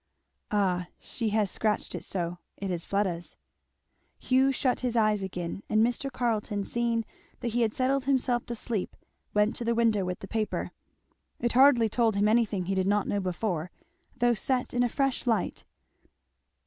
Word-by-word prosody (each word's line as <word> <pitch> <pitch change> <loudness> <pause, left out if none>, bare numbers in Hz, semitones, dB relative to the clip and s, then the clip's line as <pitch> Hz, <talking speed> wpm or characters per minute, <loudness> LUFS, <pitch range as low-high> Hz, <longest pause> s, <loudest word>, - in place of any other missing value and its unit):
"Ah 185 -4 +1
she 230 -3 -3
has 210 -2 +1
scratched 215 -1 -1
it - - -4
so. 175 -2 -2 0.2
It 195 -1 -3
is 170 -2 -3
Fleda's." 185 -4 -1 0.8
Hugh 265 +1 +3
shut 255 -1 0
his 245 -2 -2
eyes 215 -2 +3
again 180 -1 -4
and 215 +1 +4
Mr. 245 +3 -2
Carleton 220 -4 -1
seeing 235 0 0 0.4
that 240 - -1
he 240 +2 0
had 225 -2 +2
settled 260 +2 0
himself 255 -3 +1
to 235 - -3
sleep 215 -3 -3 0.4
went 210 +2 +3
to 240 - -4
the 235 0 +1
window 225 -4 +3
with 180 0 -3
the 195 - -9
paper. 215 +1 -2 0.7
It 240 0 0
hardly 255 -3 +6
told 225 -1 +1
him 205 +1 +3
anything 215 -4 +2
he 195 - -1
did 190 0 +1
not 205 0 +2
know 205 - 0
before, 180 -2 -2 0.5
though 240 0 +3
set 250 +2 -1
in 245 - +2
a 245 - +3
fresh 270 0 -1
light. 225 -2 0
220 Hz, 175 wpm, -28 LUFS, 195-240 Hz, 0.8 s, hardly